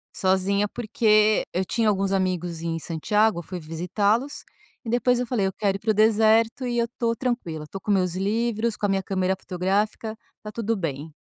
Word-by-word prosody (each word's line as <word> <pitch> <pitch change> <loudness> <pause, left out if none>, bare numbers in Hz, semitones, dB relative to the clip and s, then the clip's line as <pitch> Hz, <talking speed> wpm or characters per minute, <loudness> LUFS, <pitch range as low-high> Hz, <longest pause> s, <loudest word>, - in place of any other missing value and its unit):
Sozinha, 195 +2 +2
porque 215 -1 +2
eu 185 +1 0
tinha 225 +1 +1
alguns 195 -1 0
amigos 180 -3 -1
em 165 -1 -2
Santiago, 210 +5 +1
eu - - -7
fui 180 +2 -6
visitá-los 200 - -1 0.4
e 225 - -6
depois 245 +1 +2
eu 250 - -2
falei: 220 -6 0
"Eu 190 - -3
quero 200 -2 0
ir - - -23
para 220 +1 +1
o - - +1
deserto 220 +3 +3
e 240 -1 -1
eu 235 - +2
estou 230 0 -2
tranquila. 220 -12 -3
Estou 195 +5 -8
com 210 - -2
meus 180 -3 +1
livros, 225 +3 0
com 205 - -1
a - - +1
minha 195 -1 +1
câmera 190 -1 0
fotográfica, 200 +5 -2 0.2
tá 210 - -7
tudo 230 0 -1
bem". 155 -4 -4
205 Hz, 195 wpm, -24 LUFS, 185-225 Hz, 0.4 s, deserto